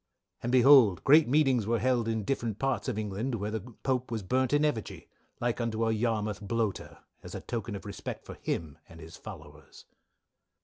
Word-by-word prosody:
"And 120 - -2
behold 125 - +6
great 150 +3 +6
meetings 130 -5 +3
were 115 +1 +2
held 120 -2 +1
in 110 -1 -1
different 115 -2 -2
parts 135 +3 -1
of 125 -5 -2
England 110 +4 -2
where 105 -1 -3
the 110 - -2
Pope 125 +3 -3
was 115 -3 -3
burnt 130 +6 +1
in 145 +1 +3
effigy, 120 -8 -3 0.3
like 120 0 -1
unto 115 -1 -1
a 110 - +2
Yarmouth 110 -2 -1
Bloater, 110 0 -3 0.2
as - - -9
a - - -5
token 115 -3 -4
of 100 - -8
respect 100 -1 -7
for - - -8
him 75 -4 -4
and 80 - -13
his 80 +1 -11
followers. 75 -7 -12
115 Hz, 185 wpm, -29 LUFS, 105-125 Hz, 0.3 s, behold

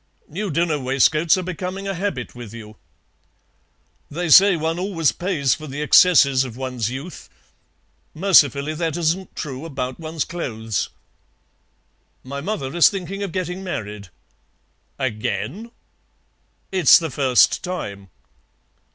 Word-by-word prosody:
New 195 +6 -4
dinner 165 -1 0
waistcoats 140 +6 +2
are 185 - -3
becoming 185 +2 -5
a 195 - -2
habit 180 -9 -4
with 120 -3 -10
you." 110 -2 -11 1.3
"They 170 +3 -3
say 190 +3 +7
one 160 +2 -2
always 180 -5 +1
pays 165 -8 0
for 155 0 -7
the 145 +2 -4
excesses 145 -5 +5
of 125 -3 -8
one's 125 -4 -3
youth; 135 +8 -8 0.9
mercifully 155 -5 +3
that 160 0 -2
isn't 175 +3 -1
true 135 -1 -6
about 130 -4 -5
one's 160 -1 -3
clothes. 110 - -4 1.3
My 140 +2 -6
mother 150 -6 -4
is 175 - +6
thinking 195 0 -6
of 200 -3 -3
getting 185 +1 -4
married." 105 - -6 0.9
"Again!" 130 - -3 1.0
"It's 185 -7 +6
the 165 -4 -4
first 130 -2 +3
time." 100 - -6
155 Hz, 125 wpm, -21 LUFS, 130-180 Hz, 1.3 s, say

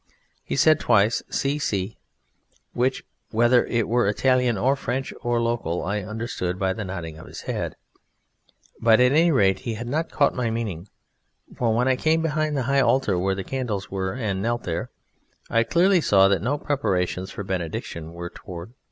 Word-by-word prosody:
He - - -3
said 155 +2 +5
twice, 105 +3 +3
"Si, 140 +2 -1
si," 100 -6 -2 0.7
which, 130 +2 0 0.3
whether 120 +2 +3
it 115 -2 0
were 120 -1 +2
Italian 125 +2 +2
or 130 +8 +2
French 135 0 -3
or 120 -1 0
local, 115 -8 -1
I 105 +2 -1
understood 105 -3 -4
by 95 0 0
the 105 - -5
nodding 85 -5 -6
of - - -12
his - - -9
head; - - -3 1.1
but 115 0 +5
at 125 0 +5
any 165 +4 +4
rate 95 -8 +3
he 115 -2 -4
had 115 +3 -6
not 160 +6 -1
caught 145 - +2
my 125 -3 -1
meaning, 105 -6 -4 0.7
for 115 -2 +1
when 125 +2 +2
I 130 -1 +3
came 160 +3 +2
behind 155 -1 0
the 130 - 0
high 140 +2 +2
altar 130 -7 +2
where 95 +1 0
the 95 - -4
candles 115 -4 -3
were, 95 -1 -2
and 105 -6 -2
knelt 120 +2 -1
there, 85 -1 -3 0.6
I 115 - +4
clearly 175 +8 +3
saw 95 -8 +5
that 100 -4 +2
no 140 +6 0
preparations 95 -10 -1
for 100 - -6
Benediction 85 -3 -4
were 85 +1 -7
toward. 90 +6 -9
115 Hz, 180 wpm, -24 LUFS, 95-130 Hz, 1.1 s, said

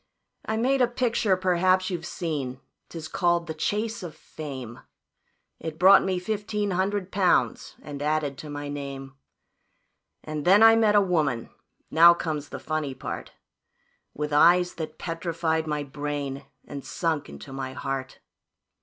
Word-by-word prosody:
"I 220 - -1
made 260 +4 +2
a 250 - +5
picture 235 -5 +1
perhaps 185 +1 +2
you've 175 -1 -4
seen, 140 -7 -4 0.3
'tis 160 -2 -7
called 175 -1 +1
the 160 - -5
`Chase 215 +8 -2
of 170 -4 -7
Fame.' 135 -8 -8 0.8
It 160 -1 -6
brought 190 +3 +7
me 190 -1 0
fifteen 210 +1 -2
hundred 190 +1 -1
pounds 185 -2 +1
and 145 -1 -7
added 150 -1 0
to 155 - -8
my 145 0 -5
name, 140 -2 -6 1.1
And 155 -1 -4
then 195 +6 +6
I 225 0 +8
met 220 -2 +3
a 205 - +7
woman 155 -10 0 0.4
now 170 +2 +8
comes 155 -4 -4
the - - -6
funny 155 -3 -3
part - - -6 0.8
With 150 0 -3
eyes 175 +4 +5
that 160 -2 -6
petrified 165 -1 -2
my 150 -1 -1
brain, 140 -1 -4 0.2
and 140 -1 -7
sunk 160 -4 -2
into 70 - -10
my 130 -1 -5
heart. 135 0 -5
160 Hz, 145 wpm, -26 LUFS, 145-185 Hz, 1.1 s, I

